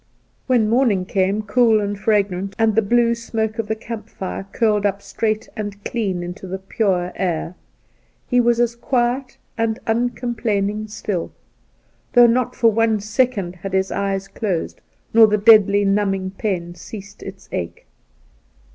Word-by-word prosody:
When 240 Hz, -5 st, +3 dB
morning 225 Hz, -5 st, +2 dB
came, 195 Hz, +2 st, 0 dB
cool 225 Hz, +1 st, +3 dB
and 205 Hz, 0 st, -2 dB
fragrant, 200 Hz, -2 st, 0 dB
and 225 Hz, -1 st, +3 dB
the 225 Hz, -, +3 dB
blue 235 Hz, +2 st, +3 dB
smoke 225 Hz, -1 st, -3 dB
of 225 Hz, -, -2 dB
the 220 Hz, -, -1 dB
camp 220 Hz, -1 st, -8 dB
fire 190 Hz, -1 st, -6 dB
curled 210 Hz, -3 st, +1 dB
up 200 Hz, -1 st, 0 dB
straight 215 Hz, +1 st, -2 dB
and 205 Hz, -1 st, -6 dB
clean 195 Hz, -7 st, -2 dB
into 180 Hz, +2 st, -7 dB
the 190 Hz, +1 st, -4 dB
pure 190 Hz, -2 st, -1 dB
air, 175 Hz, -2 st, -2 dB, 0.7 s
he 245 Hz, 0 st, +3 dB
was 235 Hz, 0 st, +2 dB
as 235 Hz, -1 st, +1 dB
quiet 245 Hz, +1 st, -1 dB, 0.2 s
and 225 Hz, -1 st, 0 dB
uncomplaining 225 Hz, -3 st, -1 dB
still, 205 Hz, -4 st, -4 dB, 0.8 s
though 245 Hz, -1 st, +8 dB
not 240 Hz, +1 st, +1 dB
for 230 Hz, -1 st, +4 dB
one 225 Hz, 0 st, +2 dB
second 210 Hz, -4 st, -1 dB
had 190 Hz, +2 st, -7 dB
his 190 Hz, 0 st, +1 dB
eyes 195 Hz, -1 st, -2 dB
closed 195 Hz, -4 st, -3 dB, 0.3 s
nor 225 Hz, -1 st, +8 dB
the 210 Hz, 0 st, +2 dB
deadly 205 Hz, -2 st, +6 dB
numbing 195 Hz, -1 st, 0 dB
pain 185 Hz, -4 st, -3 dB
ceased 200 Hz, +2 st, -11 dB
its 195 Hz, -1 st, -10 dB
ache. 85 Hz, -, -5 dB
210 Hz, 150 wpm, -20 LUFS, 195-230 Hz, 0.8 s, though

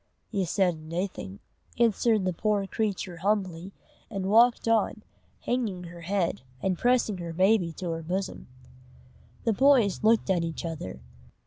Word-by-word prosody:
"Ye 195 Hz, -2 st, 0 dB
said 175 Hz, -1 st, +1 dB
naething," 165 Hz, -, -5 dB, 0.4 s
answered 225 Hz, -3 st, +3 dB
the 185 Hz, -, 0 dB
poor 205 Hz, +2 st, 0 dB
creature, 195 Hz, -3 st, -2 dB
humbly, 190 Hz, -1 st, -1 dB, 0.4 s
and 195 Hz, -4 st, -4 dB
walked 235 Hz, +2 st, +5 dB
on, 220 Hz, -1 st, +1 dB, 0.4 s
hanging 220 Hz, -8 st, -2 dB
her 170 Hz, 0 st, -10 dB
head, 180 Hz, -3 st, -1 dB, 0.2 s
and 185 Hz, +6 st, 0 dB
pressing 240 Hz, -2 st, +1 dB
her 170 Hz, -1 st, -5 dB
baby 185 Hz, 0 st, +3 dB
to 175 Hz, +1 st, -4 dB
her 165 Hz, 0 st, -3 dB
bosom. 185 Hz, +4 st, -4 dB, 1.0 s
The 225 Hz, -, +2 dB
boys 245 Hz, -5 st, +4 dB
looked 220 Hz, -2 st, +3 dB
at 175 Hz, -3 st, +1 dB
each 165 Hz, 0 st, -4 dB
other. 155 Hz, -, -6 dB
190 Hz, 140 wpm, -27 LUFS, 170-215 Hz, 1.0 s, walked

